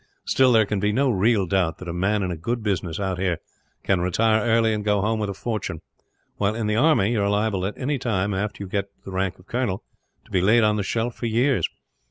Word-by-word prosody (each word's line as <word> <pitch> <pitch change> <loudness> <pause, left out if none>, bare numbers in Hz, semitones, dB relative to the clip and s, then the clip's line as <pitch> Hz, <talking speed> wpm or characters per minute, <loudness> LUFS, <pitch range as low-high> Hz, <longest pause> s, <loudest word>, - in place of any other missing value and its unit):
Still, 130 -1 +4
there 110 -2 +5
can 105 0 -2
be 105 +1 +1
no 135 +4 +2
real 105 0 +2
doubt 90 -2 0
that 90 - -9
a 85 - -3
man 100 +4 0
in 90 - -2
a - - -3
good 115 +8 -3
business, 90 -5 -2
out 95 -2 -2
here, 90 -3 0 0.5
can 95 -3 +1
retire 110 +5 +2
early 115 -1 +3
and 105 -1 -2
go 105 -1 +2
home 110 +3 0
with 105 -1 -2
a - - -2
fortune; 100 -7 -3 0.6
while 105 +1 0
in 115 -1 -2
the 105 0 0
army 120 -5 +3
you 115 -3 +1
are 100 - +1
liable 100 -2 0
at 105 - -6
any 140 +1 -1
time, 100 -4 0
after 100 +1 -3
you - - -7
get 100 +1 -1
to - - -40
the 95 - -7
rank 95 -1 -1
of 90 - -19
colonel, 115 -4 -2 0.4
to - - -21
be 90 - +2
laid 110 +5 +4
on 105 0 +3
the 105 - 0
shelf 115 +4 -1
for 120 - -4
years. 120 +4 +2
105 Hz, 255 wpm, -24 LUFS, 95-115 Hz, 0.6 s, there